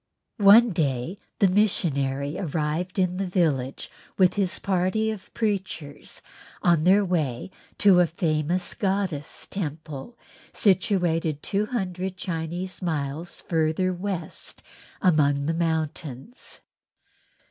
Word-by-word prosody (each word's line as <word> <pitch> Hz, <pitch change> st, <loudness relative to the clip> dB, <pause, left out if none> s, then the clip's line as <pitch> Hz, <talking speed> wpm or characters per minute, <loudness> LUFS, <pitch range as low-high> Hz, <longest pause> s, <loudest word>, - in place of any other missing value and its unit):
One 215 Hz, +3 st, +8 dB
day 155 Hz, +2 st, -1 dB, 0.2 s
the 200 Hz, -, +5 dB
missionary 145 Hz, -8 st, +1 dB
arrived 165 Hz, +1 st, -2 dB
in 180 Hz, -1 st, +1 dB
the 195 Hz, 0 st, -1 dB
village 150 Hz, -8 st, 0 dB, 0.3 s
with 185 Hz, -2 st, +5 dB
his 195 Hz, -3 st, 0 dB
party 195 Hz, +3 st, 0 dB
of 210 Hz, -3 st, -9 dB
preachers 190 Hz, -9 st, -3 dB, 0.4 s
on 170 Hz, -2 st, +3 dB
their 195 Hz, +2 st, +5 dB
way 155 Hz, -5 st, -1 dB, 0.3 s
to 195 Hz, -3 st, +6 dB
a 175 Hz, -, +5 dB
famous 165 Hz, +2 st, 0 dB
goddess' 190 Hz, -7 st, -2 dB
temple 155 Hz, -, -6 dB, 0.4 s
situated 175 Hz, -6 st, +1 dB
two 205 Hz, +2 st, 0 dB
hundred 190 Hz, -5 st, -3 dB
Chinese 180 Hz, +1 st, -4 dB
miles 155 Hz, -1 st, -3 dB
further 165 Hz, +3 st, 0 dB
west 180 Hz, -3 st, -5 dB, 0.4 s
among 145 Hz, -5 st, +3 dB
the 165 Hz, -, 0 dB
mountains. 160 Hz, -, -3 dB
175 Hz, 105 wpm, -25 LUFS, 155-190 Hz, 0.4 s, One